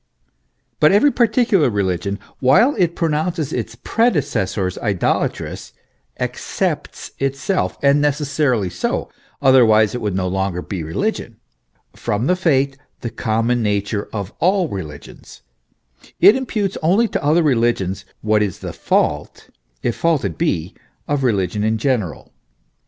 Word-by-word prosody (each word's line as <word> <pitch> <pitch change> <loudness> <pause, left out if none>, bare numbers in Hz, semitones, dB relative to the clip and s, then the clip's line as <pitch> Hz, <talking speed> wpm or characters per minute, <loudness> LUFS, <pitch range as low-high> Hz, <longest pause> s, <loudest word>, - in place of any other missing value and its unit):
But 150 - +5
every 210 +9 +5
particular 225 - +3
religion, 100 -1 -1 0.2
while 180 - +4
it 170 -2 +2
pronounces 160 -1 -1
its 120 -1 -4
predecessors 120 - 0
idolatrous, 100 -6 -2 0.4
excepts - - -3
itself 135 +7 -1
and 140 +1 +4
necessarily 140 - 0
so, - - -2 0.3
otherwise 110 -5 +5
it 125 - -4
would 105 -3 -2
no 95 -1 0
longer 95 -1 -2
be 95 -4 -5
religion 80 +1 -3 0.6
from 105 +4 -2
the 180 - +3
fate, 140 -6 +1 0.2
the 120 - -4
common 115 +1 0
nature 105 0 -1
of 100 -2 -5
all 185 +1 +2
religions: 75 -7 -9 0.8
it 210 - +7
imputes 215 -7 -2
only 195 +9 +3
to - - -3
other 155 +4 +3
religions 115 - +1 0.2
what 110 0 +2
is 100 -3 -1
the - - -7
fault, - - -1 0.3
if 120 - 0
fault 165 -4 +1
it - - -3
be, 95 - -1 0.3
of 145 -2 0
religion 105 -4 0
in 110 +1 +1
general. 110 - -2
125 Hz, 130 wpm, -19 LUFS, 100-160 Hz, 0.8 s, it